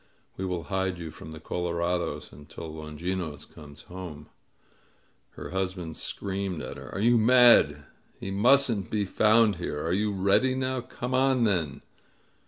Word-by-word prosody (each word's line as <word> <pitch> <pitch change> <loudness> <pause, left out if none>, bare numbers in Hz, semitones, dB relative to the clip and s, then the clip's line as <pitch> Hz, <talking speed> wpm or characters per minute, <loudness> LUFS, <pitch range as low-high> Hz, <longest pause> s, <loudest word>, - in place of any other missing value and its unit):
We 95 - -4
will 90 -3 -3
hide 95 +3 -2
you 80 -2 -7
from 80 - -11
the 80 - -9
colorados 85 +1 -2
until 75 +3 -9
Longinos 80 +1 -5
comes 75 -2 -13
home 90 -5 -9 0.5
!" - - -38
Her - - -8
husband 90 -4 -3
screamed 95 -3 -4
at - - -6
her. - - -10
"Are - - -2
you 120 +2 +4
mad? 115 - +6 0.4
He 95 - -5
mustn't 115 0 +3
be 105 -2 0
found 110 +1 +4
here! 75 -4 -4
Are 85 - 0
you 105 +2 +1
ready 100 +7 +2
now? 130 -1 -1
Come 125 +1 -6
on 130 -1 +3
then 85 -10 0
95 Hz, 155 wpm, -27 LUFS, 80-110 Hz, 0.5 s, mad